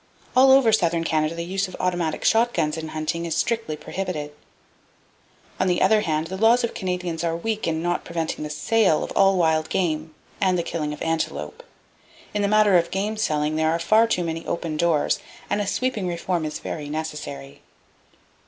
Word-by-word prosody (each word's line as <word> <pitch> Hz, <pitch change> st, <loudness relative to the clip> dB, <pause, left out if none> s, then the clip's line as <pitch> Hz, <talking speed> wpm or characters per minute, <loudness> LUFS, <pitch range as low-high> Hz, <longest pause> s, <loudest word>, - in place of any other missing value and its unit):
All 260 Hz, +1 st, +7 dB
over 265 Hz, -4 st, +6 dB
southern 170 Hz, -5 st, +2 dB
Canada 155 Hz, 0 st, 0 dB
the 170 Hz, 0 st, -4 dB
use 190 Hz, +2 st, -1 dB
of 185 Hz, -, -9 dB
automatic 175 Hz, -3 st, -1 dB
shotguns 200 Hz, -10 st, +2 dB
in 160 Hz, -1 st, -5 dB
hunting 155 Hz, +2 st, -3 dB
is 165 Hz, -, -2 dB
strictly 225 Hz, -10 st, -1 dB
prohibited. 160 Hz, -5 st, -4 dB, 1.3 s
On 185 Hz, -, +2 dB
the 180 Hz, -1 st, +2 dB
other 215 Hz, -1 st, +4 dB
hand, 155 Hz, -4 st, -1 dB
the 190 Hz, +3 st, -5 dB
laws 230 Hz, +4 st, +4 dB
of 235 Hz, -, 0 dB
the -, -, -17 dB
Canadians 180 Hz, -3 st, -3 dB
are 165 Hz, -1 st, 0 dB
weak 215 Hz, +4 st, -2 dB
in 160 Hz, 0 st, -1 dB
not 175 Hz, 0 st, -1 dB
preventing 165 Hz, -2 st, -3 dB
the 150 Hz, -, -4 dB
sale 160 Hz, +3 st, +2 dB
of -, -, -6 dB
all 195 Hz, -1 st, +4 dB
wild 160 Hz, -2 st, +2 dB
game 155 Hz, -3 st, -1 dB, 0.3 s
and 185 Hz, -2 st, +3 dB
the 170 Hz, -, 0 dB
killing 155 Hz, -3 st, -3 dB
of 150 Hz, -, -6 dB
antelope. 160 Hz, -, -2 dB, 0.7 s
In 210 Hz, -, 0 dB
the 200 Hz, -, +2 dB
matter 210 Hz, -2 st, +5 dB
of 170 Hz, -, -2 dB
game 200 Hz, +3 st, -2 dB
selling, 155 Hz, -7 st, 0 dB
there 160 Hz, 0 st, +2 dB
are 165 Hz, -, +1 dB
far 215 Hz, +7 st, +4 dB
too 180 Hz, -6 st, 0 dB
many 165 Hz, 0 st, -3 dB
open 165 Hz, -2 st, -3 dB
doors, 160 Hz, -2 st, +1 dB, 0.3 s
and 205 Hz, -, +1 dB
a 205 Hz, -, -3 dB
sweeping 220 Hz, -3 st, -1 dB
reform 170 Hz, -1 st, -2 dB
is 155 Hz, -, -4 dB
very 150 Hz, -2 st, -6 dB
necessary. 145 Hz, -, -6 dB
170 Hz, 190 wpm, -23 LUFS, 155-195 Hz, 1.3 s, All